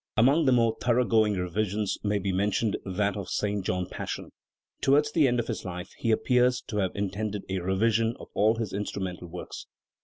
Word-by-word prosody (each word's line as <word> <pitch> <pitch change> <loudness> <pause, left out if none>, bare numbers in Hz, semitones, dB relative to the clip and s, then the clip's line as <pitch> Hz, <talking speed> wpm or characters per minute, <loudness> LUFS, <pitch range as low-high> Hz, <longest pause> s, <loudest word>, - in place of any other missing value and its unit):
Among 140 +8 +5
the 130 - +4
more 115 -2 +3
thorough 125 +1 +3
going 110 -3 +3
revisions 100 +3 -1
may 105 0 +1
be 100 -1 -1
mentioned 100 +3 +1
that 100 +1 0
of 100 - -4
the - - -11
St. 105 -1 -1
John 90 0 -1
Passion. - - -6 0.5
Towards 145 +2 +3
the 150 -3 +4
end 120 -1 +1
of 120 - -1
his - - -4
life 90 -1 -6
he 115 - -2
appears 125 +2 +3
to 105 - -3
have 95 -3 0
intended 100 +1 -3
a 95 0 -1
revision 110 +5 +1
of - - -11
all 110 +2 +3
his 115 -3 -4
instrumental 95 -3 -4
works. 90 +1 -8
105 Hz, 195 wpm, -27 LUFS, 95-115 Hz, 0.5 s, Among